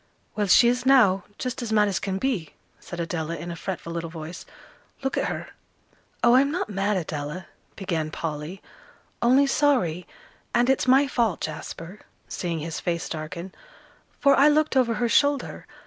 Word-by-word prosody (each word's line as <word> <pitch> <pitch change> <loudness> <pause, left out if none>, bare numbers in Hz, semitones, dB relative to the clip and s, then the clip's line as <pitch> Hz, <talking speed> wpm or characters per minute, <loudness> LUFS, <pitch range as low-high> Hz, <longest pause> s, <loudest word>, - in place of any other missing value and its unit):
"Well, 210 -1 0
she 235 +5 +7
is 245 +1 +1
now 220 -9 +5
just 255 0 -4
as 235 -2 -4
mad 210 -1 +4
as 190 -6 -1
can 190 -1 -2
be," 205 - -2 0.2
said 175 - -8
Adela, 165 -1 -3
in 170 +2 -6
a - - -5
fretful 170 -1 -5
little 165 -1 -4
voice; 160 +1 -8 0.6
"look 270 - -1
at - - 0
her." - - -5 0.7
"Oh, 240 - +6
I'm 270 +2 +5
not 335 - -2
mad, 200 +1 0
Adela," 155 +1 -4 0.3
began 165 -5 -2
Polly, 155 +3 -5 0.6
"only 255 +4 +5
sorry. 255 - +1 0.5
And 245 +2 +4
it's 265 - 0
my 265 +3 +6
fault, 230 -8 0
Jasper," 165 +4 -6 0.3
seeing 170 -2 -3
his 160 +1 -4
face 170 -1 -2
darken, 170 +3 -6 0.7
"for 280 -1 +5
I 280 +2 +6
looked 300 -1 +3
over 240 -3 +3
her 240 +3 0
shoulder. 285 +3 +1
195 Hz, 165 wpm, -25 LUFS, 170-255 Hz, 0.7 s, she